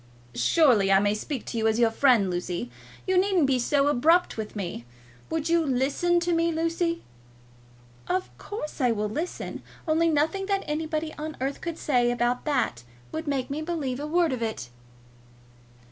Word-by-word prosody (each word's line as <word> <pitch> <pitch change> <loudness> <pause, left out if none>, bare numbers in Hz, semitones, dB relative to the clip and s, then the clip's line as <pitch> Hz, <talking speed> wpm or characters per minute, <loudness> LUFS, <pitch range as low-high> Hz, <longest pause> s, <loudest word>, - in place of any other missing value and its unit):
"Surely 240 -12 +4
I 195 - +7
may 205 +1 +2
speak 250 +4 -4
to 230 - -3
you 220 - +2
as 220 0 +2
your 235 -1 +4
friend, 225 -6 +3
Lucy. 175 -7 -3 0.3
You 375 -1 +3
needn't 375 -5 +3
be 265 -2 +2
so 275 +3 +2
abrupt 315 +6 +3
with 220 -1 -6
me. 175 - -4 0.5
Will 325 0 -1
you 335 +2 +2
listen 280 +6 +1
to 345 0 0
me, 335 0 +2
Lucy?" 335 +1 -1 1.0
"Of 370 +1 -2
course 315 -8 -6
I 250 - +4
will 210 -1 -1
listen; 320 +11 -4 0.3
only 325 +1 +3
nothing 320 +6 +1
that 395 -1 0
anybody 310 +1 -2
on 310 0 -5
earth 270 +2 -3
could 335 -2 -4
say 245 -4 +2
about 245 +1 0
that 260 - 0 0.3
would 315 0 -5
make 275 -2 -1
me 295 +2 -2
believe 305 -6 -3
a 295 - -4
word 335 -2 +2
of 250 - -4
it." 180 - -3
290 Hz, 175 wpm, -26 LUFS, 240-330 Hz, 1.0 s, I